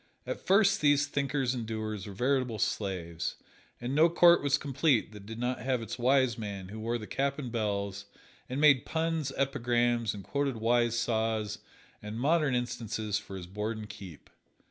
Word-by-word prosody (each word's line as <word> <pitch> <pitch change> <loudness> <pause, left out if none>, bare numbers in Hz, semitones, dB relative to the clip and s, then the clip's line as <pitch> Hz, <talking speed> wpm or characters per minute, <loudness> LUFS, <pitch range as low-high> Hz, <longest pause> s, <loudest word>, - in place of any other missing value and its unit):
At - - -4
first 200 +1 +4
these 145 -1 +4
thinkers 140 -2 -1
and 120 -2 -3
doers 110 -2 -4
were 100 - -7
veritable 125 +1 0
slaves, 85 -5 -2 0.4
and 120 +2 -3
no 160 +4 +5
court 170 +1 +6
was 140 -1 +2
complete 140 -4 +1
that 105 -2 -11
did 110 0 -7
not 125 +1 -1
have 130 -3 0
its 115 +3 -6
wise 130 -2 +3
man 100 -3 -5
who 110 +2 -7
wore 115 +2 -1
the 110 - -7
cap 140 +4 -1
and 130 -5 -5
bells, 100 -3 -2 0.4
and 130 +2 -2
made 145 -4 +6
puns, 160 -3 -1
epigrams 120 -4 +1
and 100 - -8
quoted 140 +2 -1
wise 120 +1 +2
saws 110 -2 -1 0.4
and 105 +2 -6
modern 150 0 +2
instances 115 -4 -2
for 100 -2 -9
his 90 - -7
board 105 +4 -4
and 105 -1 -8
keep. 95 -6 -11
120 Hz, 175 wpm, -30 LUFS, 105-140 Hz, 0.4 s, court